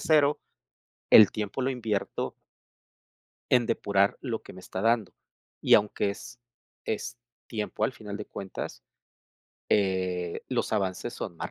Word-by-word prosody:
cero, 150 -2 +4 0.7
el 105 - +10
tiempo 105 +4 -3
lo 130 - +1
invierto 110 -6 -2 1.2
en 125 -2 +5
depurar 100 -3 +2
lo 120 -5 -3
que - - -11
me 95 - -11
está 95 - -5
dando 115 -2 +2 0.5
y - - +4
aunque 105 -1 +3
es 120 +4 -10 0.5
es 120 +3 -3 0.3
tiempo 105 -1 -3
al 110 - +2
final 105 -4 -7
de 105 - -6
cuentas, 95 -10 -7 0.9
eh, 95 -3 0
los - - -1
avances 100 +3 -1
son 85 -5 -6
más - - -5
105 Hz, 135 wpm, -28 LUFS, 95-120 Hz, 1.2 s, el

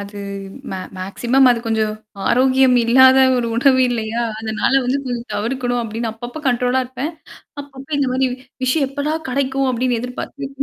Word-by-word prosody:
அது 200 0 -8 0.5
மே - - -3 0.2
மேக்ஸிமம் 245 +8 +2
அது 240 - +2
கொஞ்சம் 220 -1 0 0.3
ஆரோக்கியம் 260 0 +4
இல்லாத 260 +2 +6 0.2
ஒரு 235 - -1
உணவு 260 +1 +4
இல்லையா? 230 -1 -2 0.2
அதனால 220 +2 -1
வந்து 260 +3 0
கொஞ்சம் 240 -1 -4
தவிர்க்கணும், 245 +2 -1
அப்டின்னு 225 0 -3
அப்பப்போ, 240 +6 -8
கண்ட்ரோலா 250 +1 +1
இருப்பேன். 270 +6 -5 0.5
அப்பப்ப, 275 -1 -13
"இந்த 275 -2 +1
மாரி 260 0 +1 0.4
விஷயம் 270 +2 +2
எப்படா 290 +2 -2 0.2
கெடைக்கும்?" 270 0 0
அப்படின்னு 245 -1 0
எதிர்பாத்து 250 +3 -6
250 Hz, 145 wpm, -19 LUFS, 235-265 Hz, 0.5 s, இல்லாத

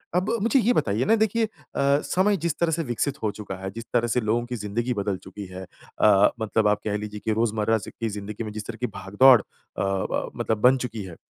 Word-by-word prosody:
अब 185 +4 +1
मुझे 235 +4 +3
ये 245 +2 +3
बताइए 105 - +1
ना 225 +3 +4
देखिए 220 +1 +1
अ, - - -10 0.3
समय 180 +8 +2
जिस 170 -3 -1
तरह 170 -1 +2
से 165 +1 0
विकसित 135 +2 -1
हो 105 - +1
चुका 100 -3 -7
है, 95 - -3
जिस 115 +2 -7
तरह 120 -1 +2
से 120 +2 +1
लोगों 115 +2 0
की 125 0 -5
जिंदगी 115 +4 -2
बदल 100 -2 -2
चुकी 100 -1 -8
है। 95 0 -8
अ, 100 +2 +2
मतलब 110 0 +1
आप 105 0 +2
कह 105 -1 -1
लीज़िए 105 0 -6
कि 110 - +1
रोजमर्रा 110 0 +1
स, 100 - -8
की 115 -1 -1
जिंदगी 105 +2 -6
में 105 - -6
जिस 105 -1 -6
तरह 115 -1 -6
की 125 - +1
भाग-दौड़ 105 +6 +5
अ, - - -20 0.4
ब 95 -1 -1
मतलब 110 - 0
बन 130 +2 +6
चुकी 115 -4 -5
है, 90 -3 -9
110 Hz, 240 wpm, -25 LUFS, 105-130 Hz, 0.4 s, बन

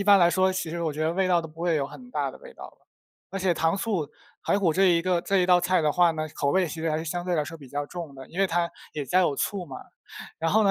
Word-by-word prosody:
一 - - -1
般 200 -1 +7
来 175 -2 +5
说 185 +1 +2
其 185 -4 -3
实 170 0 -3
我 160 -3 -1
觉 155 - -3
得 160 +1 +1
味 190 +1 +1
道 175 -1 +4
都 160 - -7
不 160 +2 -14
会 170 -1 +1
有 140 -2 0
很 250 - -12
大 145 - -1
的 - - -13
味 - - -13
道 - - -11
了。 - - -15 0.4
而 195 - -4
且 185 -2 +2
糖 165 +3 +1
醋 195 -7 -1 0.3
排 - - +1
骨 180 -5 +2
这 190 +5 +3
一 170 -2 +4
个 180 -1 +1
这 195 +2 +1
一 180 - +3
道 180 -1 +5
菜 185 0 +2
的 150 -1 +2
话 175 -1 +4
呢， 155 0 -3
口 140 - 0
味 185 +3 +2
其 160 +1 -6
实 165 0 0
还 155 - 0
是 160 - -5
相 175 +2 -3
对 180 -1 0
来 150 - +1
说 165 +3 -8
比 140 -4 -13
较 145 +2 -3
重 165 -3 -7
的， 135 -1 -10
因 180 - -4
为 195 - +4
它 170 -1 0 0.2
也 150 - -3
加 180 +8 +3
有 150 -6 +1
醋 195 +3 -2
嘛， 135 - -8 0.6
然 165 0 0
后 220 +1 +4
呢 195 - +4
170 Hz, 350 characters per minute, -26 LUFS, 155-185 Hz, 0.6 s, 般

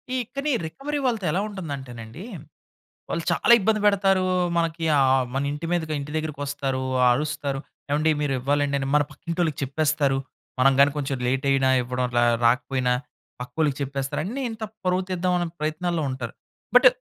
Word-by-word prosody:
ఈ - - +1 0.2
కానీ 285 +2 -1
రికవరీ 280 - -4
వాళ్ళతో 225 -6 0
ఎలా 180 - +1
ఉంటుందంటేనండి, 140 - -7 0.9
వాళ్ళు 165 - -2
చాలా 235 - +5
ఇబ్బంది 215 +1 +2
పెడతారు. 195 -2 +3 0.3
మనకి 165 0 -1
ఆ! - - +4 0.3
మన 135 +1 0
ఇంటి 150 +3 -5
మీదకి 160 -3 0
ఇంటి 145 +1 -6
దగ్గరకొస్తారు. 145 -3 -2 0.3
అరుస్తరు. 145 0 -2 0.3
ఏవండీ 155 +2 +2
మీరు 145 -2 0
ఇవ్వాలండి 140 +2 +1
అని 135 - -2
మన 150 - +5
పక్కింటోళ్ళకి 170 -3 -2
చెప్పేస్తారు. 140 0 +1 0.4
మనం 135 +1 +5
గాని 140 0 +6
కొంచెం 135 -2 -2
లేటు 135 +2 0
అయినా 135 -1 +3
ఇవ్వడం, 125 +1 -2
అలా 120 0 +3 0.2
రాకపోయినా 125 +1 +2 0.5
పక్కోళ్ళకి 140 +3 -1
చెప్పేస్తారు. 135 0 -2
అన్నీ 250 +8 -4
ఇంత 225 0 -7 0.2
పరువు 180 +1 +2
తీద్దాం 180 0 0
అనే 175 - -1
ప్రయత్నాల్లో 160 +1 -1
ఉంటారు. 120 -3 -5 0.4
బట్ 255 +1 +9
150 Hz, 150 wpm, -24 LUFS, 135-175 Hz, 0.9 s, బట్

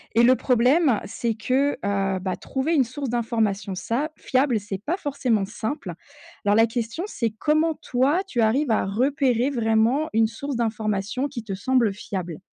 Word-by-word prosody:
et 235 - +5
le 255 +2 +6
problème 255 +1 +3
c'est 225 +2 -2
que, 265 +6 +1
heu, 195 -1 -1
bah, 185 0 -2
trouver 275 +5 -2
une 280 - +4
source 255 +2 -5
d'information 220 -4 -1
ça 235 - -2
fiable, 260 -3 +1
c'est 200 -1 -6
pas 340 - -1
forcément 255 - 0
simple. 225 +7 -5 0.5
Alors 205 +1 +4
la 225 - +6
question, 235 - -3
c'est 235 - -1
comment 310 +8 +1
toi 270 +8 +1
tu 240 -10 -1
arrives 240 +5 +2
à 220 - +2
repérer 250 +4 +1
vraiment 235 +4 +1
une 225 0 +4
source 275 +5 -5
d'information 220 +2 -1
qui 250 -5 -7
te 200 - -5
semble 230 +1 +1
fiable? 185 -5 -5
235 Hz, 165 wpm, -24 LUFS, 215-275 Hz, 0.5 s, le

